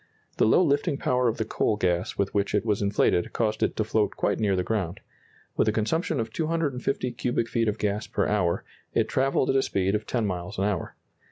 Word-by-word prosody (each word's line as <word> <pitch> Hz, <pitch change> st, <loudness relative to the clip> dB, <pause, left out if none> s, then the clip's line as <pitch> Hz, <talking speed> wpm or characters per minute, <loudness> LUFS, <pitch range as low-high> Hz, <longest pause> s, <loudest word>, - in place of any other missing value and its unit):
The -, -, +4 dB
low 145 Hz, -, +5 dB
lifting 145 Hz, 0 st, +1 dB
power 125 Hz, -2 st, +1 dB
of 115 Hz, -, 0 dB
the 110 Hz, -, -1 dB
coal 110 Hz, -, 0 dB
gas 90 Hz, -2 st, 0 dB
with 100 Hz, -1 st, 0 dB
which 100 Hz, 0 st, 0 dB
it 105 Hz, -, +1 dB
was 105 Hz, -2 st, +1 dB
inflated 100 Hz, -3 st, +1 dB
caused 110 Hz, -1 st, 0 dB
it -, -, +1 dB
to 110 Hz, -, +1 dB
float 110 Hz, -1 st, 0 dB
quite -, -, 0 dB
near 100 Hz, -3 st, +2 dB
the 90 Hz, -, 0 dB
ground. 95 Hz, -4 st, -2 dB, 0.6 s
With -, -, +2 dB
a -, -, +4 dB
consumption 135 Hz, +8 st, 0 dB
of 115 Hz, -1 st, -3 dB
250 145 Hz, -6 st, -1 dB
cubic 120 Hz, 0 st, -1 dB
feet 115 Hz, 0 st, 0 dB
of 105 Hz, 0 st, 0 dB
gas 105 Hz, +1 st, -1 dB
per -, -, 0 dB
hour, 90 Hz, -5 st, +1 dB, 0.3 s
it -, -, +2 dB
travelled 135 Hz, 0 st, +1 dB
at -, -, -1 dB
a 135 Hz, -, +4 dB
speed 95 Hz, -5 st, 0 dB
of 105 Hz, 0 st, -2 dB
ten 120 Hz, -3 st, 0 dB
miles 90 Hz, 0 st, -4 dB
an 95 Hz, -, 0 dB
hour. 100 Hz, -4 st, -2 dB
110 Hz, 225 wpm, -26 LUFS, 100-125 Hz, 0.6 s, low